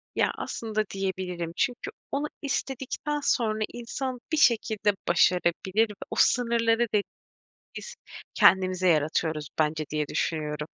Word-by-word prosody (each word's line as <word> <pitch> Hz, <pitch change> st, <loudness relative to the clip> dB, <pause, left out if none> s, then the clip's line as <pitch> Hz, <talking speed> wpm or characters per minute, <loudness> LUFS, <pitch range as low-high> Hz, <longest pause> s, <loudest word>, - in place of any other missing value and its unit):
Ya, -, -, +2 dB
aslında 215 Hz, -2 st, -3 dB
diyebilirim. 185 Hz, -3 st, -3 dB
Çünkü 245 Hz, 0 st, -1 dB, 0.2 s
onu 285 Hz, +2 st, -1 dB
istedikten 275 Hz, +2 st, -3 dB
sonra 220 Hz, -5 st, +1 dB
insan 250 Hz, +1 st, -4 dB
bir 315 Hz, -, +1 dB
şekilde 220 Hz, -6 st, +3 dB
başarabilir 180 Hz, +4 st, +2 dB
ve 210 Hz, -, -9 dB, 0.2 s
o -, -, -3 dB
sınırları 235 Hz, -1 st, +3 dB
de 205 Hz, -, +3 dB, 0.7 s
biz -, -, -7 dB, 0.4 s
kendimize 185 Hz, -1 st, +4 dB
yaratıyoruz 155 Hz, -1 st, +1 dB
bence 155 Hz, 0 st, +1 dB
diye 150 Hz, -1 st, -1 dB
düşünüyorum. 150 Hz, -2 st, -2 dB
205 Hz, 115 wpm, -27 LUFS, 170-235 Hz, 0.7 s, kendimize